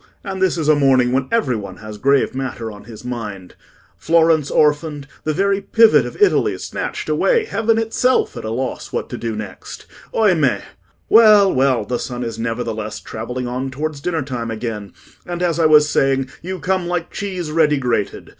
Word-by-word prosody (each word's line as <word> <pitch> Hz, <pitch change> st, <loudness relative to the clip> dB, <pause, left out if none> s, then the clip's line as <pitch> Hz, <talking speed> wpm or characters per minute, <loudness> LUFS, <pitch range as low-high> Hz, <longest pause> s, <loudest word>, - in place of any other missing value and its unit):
And 190 Hz, -2 st, -5 dB
this 185 Hz, -2 st, +2 dB
is 160 Hz, -3 st, -2 dB
a 155 Hz, -, +6 dB
morning 130 Hz, -3 st, +3 dB
when 130 Hz, +1 st, 0 dB
every 220 Hz, -, +1 dB
one 105 Hz, -2 st, -7 dB
has 110 Hz, -1 st, -9 dB
grave 140 Hz, 0 st, +2 dB
matter 125 Hz, -4 st, -4 dB
on 105 Hz, -1 st, -13 dB
his 115 Hz, +1 st, -11 dB
mind. 105 Hz, -7 st, -6 dB, 0.5 s
Florence 160 Hz, -, +3 dB
orphaned—the 150 Hz, 0 st, 0 dB
very 195 Hz, +5 st, +1 dB
pivot 225 Hz, +2 st, +4 dB
of -, -, -10 dB
Italy 415 Hz, -, +3 dB
snatched -, -, -5 dB
away—heaven 425 Hz, -, +1 dB
itself 225 Hz, -, +1 dB
at 115 Hz, -, -7 dB
a 110 Hz, -, -4 dB
loss 125 Hz, +3 st, -4 dB
what -, -, -3 dB
to -, -, -5 dB
do 115 Hz, -2 st, -3 dB
next. 105 Hz, -3 st, -8 dB, 0.3 s
Oimè! 175 Hz, -, +2 dB, 0.5 s
Well, 215 Hz, -3 st, +6 dB
well; 130 Hz, -4 st, +2 dB
the 120 Hz, +3 st, -2 dB
sun 125 Hz, -1 st, -5 dB
is 115 Hz, -1 st, -5 dB
nevertheless 115 Hz, -2 st, -3 dB
travelling 125 Hz, +3 st, -5 dB
on 130 Hz, +2 st, -3 dB
towards 145 Hz, +2 st, -4 dB
dinner 165 Hz, -2 st, -1 dB
time 125 Hz, -4 st, -4 dB
again; 110 Hz, -3 st, -5 dB, 0.4 s
and, 175 Hz, 0 st, -3 dB
as 170 Hz, -1 st, 0 dB
I 160 Hz, -, +5 dB
was 150 Hz, -1 st, +6 dB
saying, 135 Hz, -2 st, +1 dB
you 185 Hz, +2 st, -5 dB
come 185 Hz, +2 st, -1 dB
like 175 Hz, -1 st, -3 dB
cheese 185 Hz, -5 st, -4 dB
ready 155 Hz, -2 st, +3 dB
grated. 120 Hz, -6 st, -2 dB
140 Hz, 175 wpm, -19 LUFS, 120-175 Hz, 0.5 s, a